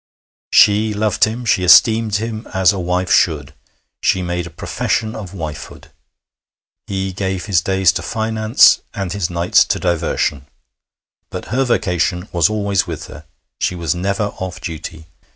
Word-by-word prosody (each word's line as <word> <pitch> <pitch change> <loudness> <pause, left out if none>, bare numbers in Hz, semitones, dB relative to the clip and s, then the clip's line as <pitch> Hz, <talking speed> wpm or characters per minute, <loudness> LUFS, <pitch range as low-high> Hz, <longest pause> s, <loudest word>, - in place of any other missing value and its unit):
She 105 +1 +4
loved 105 -2 +2
him. 115 +3 -5
She 95 -4 +2
esteemed 110 +4 +5
him 110 +1 -4
as 95 +1 +4
a 100 - -4
wife 90 +1 -1
should. - - +2 0.5
She 95 - +1
made 90 0 -3
a - - -9
profession 110 +6 -2
of 100 -3 -8
wifehood. 80 -4 -8 1.0
He 95 -1 -3
gave 95 -2 -3
his 90 -4 +2
days 95 0 +2
to - - -4
finance 110 +1 +3 0.2
and 95 -4 -3
his 100 -3 -2
nights 85 0 +3
to - - -1
diversion; 80 -5 -1 0.8
but - - -7
her 135 +1 +1
vocation 90 -5 -1
was 85 0 +2
always 100 -4 0
with 80 -3 -6
her 75 +1 -12 0.3
she 90 - -1
was 85 -2 -1
never 100 +4 -2
off 95 -1 -5
duty. 80 -2 -7
95 Hz, 150 wpm, -18 LUFS, 85-105 Hz, 1.0 s, esteemed